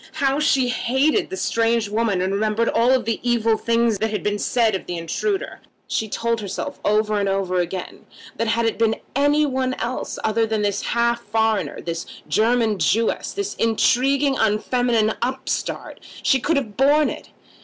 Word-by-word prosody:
How 275 0 +1
she 270 -4 +2
hated 265 - +1
the 380 - -5
strange 230 - +1
woman, 210 -3 0
and 190 +1 -1
remembered 215 +3 +1
all 250 +3 +3
the 230 -2 -2
evil 230 -2 +2
things 230 -1 +1
that 220 - 0
had 210 - -3
been 205 0 -1
said 230 -1 +1
of 190 - -4
the 175 - -3
intruder! 385 - -3 0.2
She 220 - -2
told 230 +1 -1
herself 210 +8 -5
over 210 0 +1
and 200 -1 0
over 190 -2 0
again 180 +1 -5 0.3
that 230 - -1
had 230 +1 +1
it 225 - -1
been 225 -1 +2 0.2
any 290 +2 +3
one 260 -2 -1
else 240 +2 -4 0.2
than 220 -1 0
this 200 -1 0
half 235 0 0
foreigner, 220 0 -1
this 170 0 -5 0.2
German 225 -2 +2
Jewess, 225 +4 +1
this 405 -1 -3
intriguing 265 +5 +2
unfeminine 220 +1 +1
upstart, 260 +2 -3 0.2
she 265 - +3
could 325 +5 +1
have 220 -7 -3
borne 290 +3 +3
it. - - -9
230 Hz, 165 wpm, -22 LUFS, 215-255 Hz, 0.3 s, all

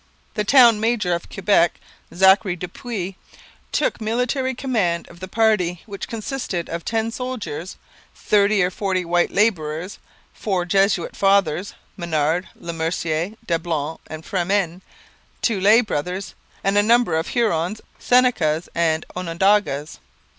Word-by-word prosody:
The 210 - -1
town 235 -1 +6
major 220 -5 +1
of 170 - -4
Quebec, 185 -3 +2 0.3
Zachary 190 +1 +4
du 180 +1 -6
Puys, 195 -2 -5 0.6
took - - 0
military 250 +4 -1
command 215 -11 -1
of 170 - -15
the 185 - -7
party, 190 -5 +1
which 200 -2 -7
consisted 225 - -4
of 170 0 -4
ten 225 0 -1
soldiers, 225 - -5 0.4
thirty 205 -1 +2
or 180 - 0
forty 185 -2 -1
white 175 +1 +2
labourers, 180 -4 0 0.3
four 190 -4 -2
Jesuit 195 -1 +1
fathers 195 -2 +2 0.2
Menard, 165 0 -1
Le 170 - -7
Mercier, 165 +2 -2
Dablon, 165 -3 -2
and 155 0 -8
Fremin 185 -1 -1 0.6
two 215 -5 +1
lay 215 +5 +6
brothers, 185 -1 -4 0.3
and 200 +1 +3
a - - +6
number 230 -4 +3
of 160 +1 -1
Hurons, 210 -4 0 0.2
Senecas, 180 -11 +2
and 160 -1 +1
Onondagas. 180 -3 0
190 Hz, 130 wpm, -21 LUFS, 170-215 Hz, 0.6 s, town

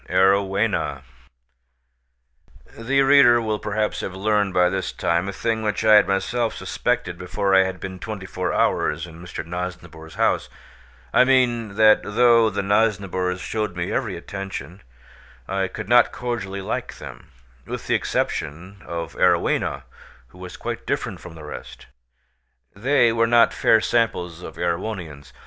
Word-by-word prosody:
AROWHENA 95 +2 +1 1.7
The 135 +4 +1
reader 135 -4 +6
will 110 -2 -2
perhaps 105 +1 -2
have 95 - -5
learned 105 0 +1
by 90 -1 +3
this 95 +1 -2
time 85 +3 -1
a - - -2
thing 110 +3 -2
which 105 0 -2
I 110 - +6
had 105 -1 +7
myself 110 +5 -1
suspected 120 -8 -2
before 95 +2 -1
I 95 0 +6
had 95 -1 -5
been 95 -1 -7
twenty 105 -1 -6
four 90 -1 -3
hours 75 +2 0
in 85 0 -13
Mr. 85 -2 -7
Nosnibor's 85 -2 -7
house—I 65 - -1
mean, 120 -5 +2
that 110 0 +6
though 115 +1 +4
the 100 -1 -3
Nosnibors 95 -3 0
showed 105 -5 -3
me 85 -1 -3
every - - -2
attention, 95 -2 -7 0.7
I 95 0 -1
could 90 - -7
not 120 +1 +5
cordially 105 -6 -4
like - - -4
them, - - -11 0.4
with - - -6
the - - 0
exception 90 +6 -2
of 85 -1 -5
Arowhena 65 0 +1 0.5
who 90 - -18
was 90 -1 -9
quite - - -6
different - - -2
from 85 -2 -11
the 80 - -11
rest. 75 - -9 0.9
They 120 +1 +3
were 115 0 +2
not 120 0 +4
fair 110 - +4
samples 100 -7 -1
of 80 -2 -9
Erewhonians. 85 - -4
95 Hz, 145 wpm, -22 LUFS, 90-110 Hz, 1.7 s, had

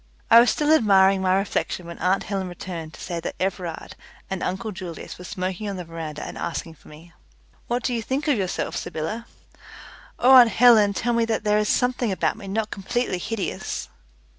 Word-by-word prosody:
I 230 - +10
was 240 - +5
still 300 +1 +2
admiring 195 -7 +5
my 185 0 +2
reflection 195 -2 -2
when 170 0 -9
aunt 190 +2 +1
Helen 195 -2 -3
returned 170 -3 -7
to - - -15
say 175 -2 -4
that - - -5
Everard 180 -3 -4 0.4
and 190 - -3
uncle 205 +4 -3
Julius 180 -4 -8
were - - -9
smoking 190 +2 -4
on 200 - -4
the 180 - -5
veranda 160 -2 -6
and - - -7
asking 170 -1 -4
for - - -21
me. 160 +3 -15 0.5
"What 240 0 -1
do 250 - 0
you 230 - -1
think 265 +7 -2
of 290 - +3
yourself, 190 -4 -2
Sybylla?" 190 +10 -4 0.9
"Oh, 255 - +4
aunt 250 -3 +9
Helen, 220 -4 +6
tell 240 +4 0
me 230 0 +2
that 225 -1 -1
there 210 0 +3
is 210 - 0
something 250 -3 +1
about 190 - 0
me 205 -2 -10
not 215 +2 -2
completely 200 0 -2
hideous!" 220 +2 -4
195 Hz, 195 wpm, -24 LUFS, 180-230 Hz, 0.9 s, I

